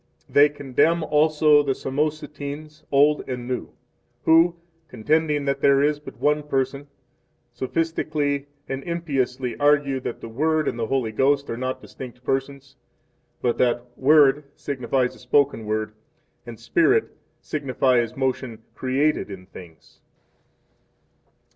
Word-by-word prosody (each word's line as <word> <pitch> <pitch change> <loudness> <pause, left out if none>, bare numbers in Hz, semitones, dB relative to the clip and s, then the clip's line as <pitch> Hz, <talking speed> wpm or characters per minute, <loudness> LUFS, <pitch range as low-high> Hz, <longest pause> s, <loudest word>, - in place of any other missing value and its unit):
6 - - -36
They 145 +1 +7
condemn 145 +4 +1
also 150 0 +4
the 140 -2 0
Samosatenes, 150 +1 -4
old 145 +2 +4
and 125 -1 -4
new, 125 -1 -3 0.5
who, 165 +2 +5 0.3
contending 150 +4 0
that 140 0 -1
there 140 0 +4
is 150 0 +1
but 150 - -11
one 150 +1 +2
Person, 140 0 -2 0.7
sophistically 145 0 -1 0.2
and 135 0 -4
impiously 135 -7 -2
argue 145 -2 +3
that 125 - -5
the - - -8
Word 155 +6 0
and 120 - -2
the 115 - -1
Holy 130 -4 -1
Ghost 140 +4 +1
are - - -2
not 130 +2 -4
distinct 125 -1 -10
Persons, 135 0 -3 0.7
but 120 - 0
that 120 0 0
"Word" 145 0 +4
signifies 130 -2 -1
a - - -16
spoken 125 -3 +1
word, 110 0 -2 0.5
and 115 -2 -9
"Spirit" 375 - +2 0.2
signifies 130 -4 0
motion 130 -4 -2
created 135 0 0
in 95 -2 -9
things. 85 -4 -15
140 Hz, 130 wpm, -23 LUFS, 125-150 Hz, 0.7 s, They